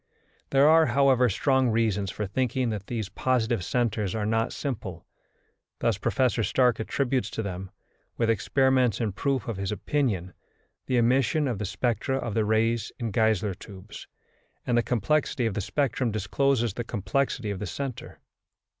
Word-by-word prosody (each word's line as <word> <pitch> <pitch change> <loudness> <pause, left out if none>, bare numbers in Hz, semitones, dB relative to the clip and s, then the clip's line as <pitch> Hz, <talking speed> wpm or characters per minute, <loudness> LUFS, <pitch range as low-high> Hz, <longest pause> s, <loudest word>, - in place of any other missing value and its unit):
There 140 +1 +5
are, 160 0 +6
however, 130 0 +4
strong 130 +4 +2
reasons 110 -4 +1
for 105 - -3
thinking 125 +3 -1
that 100 -2 -5
these 110 -4 -3
positive 120 -5 0
centres 110 -4 -1
are 105 -2 -1
not 115 +1 0
simple. 105 - -5 0.7
Thus 115 -4 0
Professor 125 +1 +1
Stark 125 +3 +2
attributes 130 +3 -1
to 110 - -4
them, 95 -1 -5 0.5
with 115 - +1
experiments 130 +1 +2
in 110 -3 0
proof 130 +4 -1
of 115 -4 -3
his 95 0 -2
opinion, 105 - -1 0.5
the 130 - +1
emission 130 +5 +2
of 120 -6 -2
the 105 - -2
spectra 120 +6 -1
of 120 -5 -3
the 110 0 +1
rays 110 +1 +1
in 115 -3 -3
Geissler 110 -1 +1
tubes, 100 +2 -11 0.6
and 125 - +1
the 120 - +4
complexity 125 +3 0
of 110 - 0
the 105 - -2
spectrum 135 +1 0
discloses 115 +3 0
the 120 - -4
complexity 110 +2 -1
of 100 - -4
the 105 - -4
centre. 135 +4 -6
115 Hz, 160 wpm, -27 LUFS, 105-130 Hz, 0.7 s, are